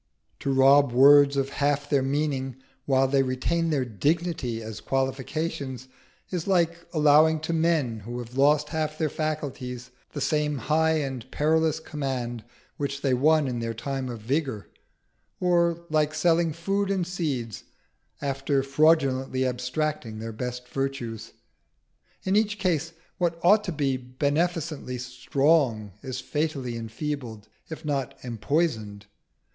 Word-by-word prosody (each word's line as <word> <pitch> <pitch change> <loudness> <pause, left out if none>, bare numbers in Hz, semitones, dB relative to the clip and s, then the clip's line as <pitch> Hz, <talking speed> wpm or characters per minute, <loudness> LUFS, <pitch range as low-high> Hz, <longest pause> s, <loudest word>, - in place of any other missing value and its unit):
To 140 - -1
rob 135 0 +5
words 140 +2 +7
of 135 0 0
half 145 0 0
their 140 -2 +2
meaning, 135 -2 -1 0.3
while 135 -1 +3
they 135 0 +3
retain 135 +6 0
their 140 -5 +1
dignity 140 - -1
as 110 -1 -7
qualifications, 135 0 -2 0.4
is 180 -2 -3
like 170 -3 +1
allowing 155 0 +5
to 160 +1 -2
men 160 -8 +1
who 120 +4 -7
have 120 0 -8
lost 145 +2 +3
half 155 -1 -2
their 155 -2 0
faculties 130 -5 -4 0.2
the 145 - -4
same 150 +1 0
high 160 +5 +2
and 135 -6 -3
perilous 160 +1 +1
command 130 -7 -4 0.3
which 140 -1 -3
they 135 -2 +2
won 150 +3 +3
in 125 -2 -2
their 115 -1 -3
time 135 +2 -3
of 115 -3 -6
vigour; 130 -3 -2 0.7
or 170 -1 +2
like 155 0 +2
selling 170 -1 +3
food 195 +5 -1
and 190 -3 0
seeds 145 - -3 0.6
after 135 0 0
fraudulently 135 -3 +2
abstracting 125 -1 -2
their 115 +1 -6
best 125 +2 -5
virtues: 120 -4 -4 0.9
in 190 +1 +1
each 210 0 +2
case 170 -5 0 0.3
what 170 -2 0
ought 210 +3 +6
to 185 - -2
be 140 -4 0
beneficently 145 +2 -2
strong 125 -2 +1
is 130 -2 -5
fatally 145 -6 -2
enfeebled, 115 -1 -5 0.2
if 160 -1 -8
not 140 -3 -2
empoisoned. 110 -3 -1
140 Hz, 135 wpm, -26 LUFS, 125-160 Hz, 0.9 s, words